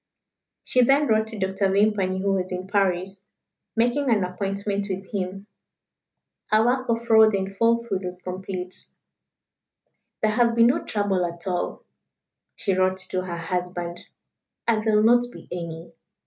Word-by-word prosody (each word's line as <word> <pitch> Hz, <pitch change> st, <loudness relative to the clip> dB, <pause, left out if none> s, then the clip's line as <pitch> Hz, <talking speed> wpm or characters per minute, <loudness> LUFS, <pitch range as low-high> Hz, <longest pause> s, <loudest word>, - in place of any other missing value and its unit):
She 255 Hz, -, +3 dB
then 275 Hz, +4 st, +4 dB
wrote 220 Hz, -3 st, +2 dB
to 220 Hz, -1 st, -7 dB
Dr. 190 Hz, 0 st, 0 dB
Vimpany, 195 Hz, -2 st, +2 dB
who 200 Hz, -1 st, +2 dB
was 185 Hz, -1 st, -2 dB
in 185 Hz, 0 st, -4 dB
Paris, 190 Hz, -1 st, 0 dB, 0.5 s
making 245 Hz, +4 st, +1 dB
an 215 Hz, -5 st, +3 dB
appointment 200 Hz, +2 st, -2 dB
with 190 Hz, 0 st, -5 dB
him. 195 Hz, 0 st, -4 dB, 1.0 s
Her 215 Hz, +1 st, +3 dB
work 255 Hz, +1 st, +1 dB
of 230 Hz, 0 st, 0 dB
fraud 220 Hz, -2 st, +6 dB
and 195 Hz, 0 st, -3 dB
falsehood 230 Hz, -3 st, +1 dB
was 180 Hz, 0 st, -5 dB
complete. 185 Hz, 0 st, -4 dB, 1.4 s
"There 215 Hz, -, +3 dB
has 235 Hz, +1 st, +3 dB
been 230 Hz, 0 st, +5 dB
no 245 Hz, -, +2 dB
trouble 205 Hz, -3 st, 0 dB
at 170 Hz, 0 st, -5 dB
all," 180 Hz, -2 st, -2 dB, 0.7 s
she 195 Hz, -, -1 dB
wrote 185 Hz, 0 st, +2 dB
to 185 Hz, -, 0 dB
her 170 Hz, -2 st, -4 dB
husband; 175 Hz, 0 st, -3 dB, 0.7 s
"and 220 Hz, -2 st, +2 dB
there 220 Hz, -1 st, +2 dB
will 210 Hz, -, +4 dB
not 240 Hz, +2 st, +5 dB
be -, -, -13 dB
any. 170 Hz, -2 st, -6 dB
195 Hz, 150 wpm, -24 LUFS, 185-220 Hz, 1.4 s, fraud